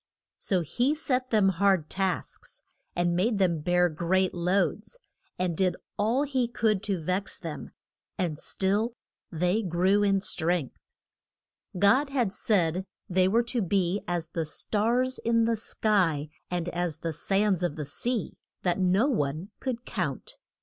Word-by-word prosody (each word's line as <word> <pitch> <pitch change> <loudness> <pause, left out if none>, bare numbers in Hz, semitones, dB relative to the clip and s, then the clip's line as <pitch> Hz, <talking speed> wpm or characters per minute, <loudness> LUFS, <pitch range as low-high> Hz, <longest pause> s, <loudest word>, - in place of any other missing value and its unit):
So 185 -3 +1
he 245 - 0
set 255 -4 -1
them 210 -4 +4
hard 190 -3 +2
tasks, 190 +1 -3 0.3
and 175 0 +1
made 210 +5 +1
them 180 -5 +2
bear 180 +3 +3
great 175 +3 0
loads, 185 - 0 0.4
and 180 -2 -1
did 185 +1 +1 0.2
all 230 +7 +1
he 265 -4 0
could 220 -4 +1
to 195 -4 -1
vex 185 +5 -1
them, - - -7 0.5
and 170 -6 -2
still 210 +5 0 0.4
they 180 +5 +1
grew 190 +2 +2
in 195 -1 +3
strength. 170 -6 0 1.0
God 255 +10 +4
had 245 -8 0
said 185 -5 +1 0.2
they 185 0 +3
were 230 +5 +3
to 240 0 0
be 190 0 +1
as 170 -2 -2
the 165 -2 -3
stars 235 +10 0
in 230 0 +2
the 230 0 +2
sky, 185 -9 +1 0.2
and 175 -1 -2
as 175 -3 -2
the 165 -1 -2
sands 195 +3 +1
of 175 -5 -1
the 150 - -4
sea, 235 - -2 0.3
that 180 0 +1
no 190 +7 +3
one 160 - -1
could 250 -2 -4
count. - - -4
190 Hz, 150 wpm, -28 LUFS, 175-225 Hz, 1.0 s, them